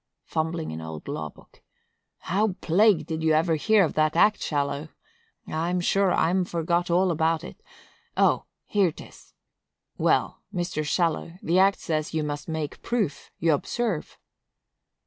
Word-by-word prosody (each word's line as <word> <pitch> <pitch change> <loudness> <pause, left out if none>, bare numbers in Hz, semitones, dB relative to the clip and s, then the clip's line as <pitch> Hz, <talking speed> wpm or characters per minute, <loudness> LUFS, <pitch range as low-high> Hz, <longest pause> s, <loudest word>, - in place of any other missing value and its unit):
[Fumbling 160 +1 -2
an 80 +1 -6
old 80 -1 -8
law 75 0 -4
book.] - - -21 0.6
How 200 +3 +1
plagued 185 -1 +3
did 160 -1 -4
you 160 0 +3
ever 165 +2 +3
hear 210 +6 +4
of - - -4
that 155 0 +2
act, 210 +5 +4
Shallow? 145 +1 -2 0.6
I'm 170 +3 -1
sure 195 +2 +2
I'm 180 +3 +2
forgot 170 0 -1
all 180 +2 +3
about 160 0 +1
it;—O! - - -2 0.2
here 195 -5 +2
'tis. - - -14 0.6
Well, - - +1
Mr. 175 -4 -2
Shallow, 165 +1 0
the 175 +3 +2
act 195 +1 +4
says 155 -1 -2
you 155 - +1
must 145 -1 -4
make 155 -2 -4
proof, 215 - -2
you 165 -1 +3
observe." 205 +3 -2
165 Hz, 145 wpm, -26 LUFS, 155-185 Hz, 0.6 s, hear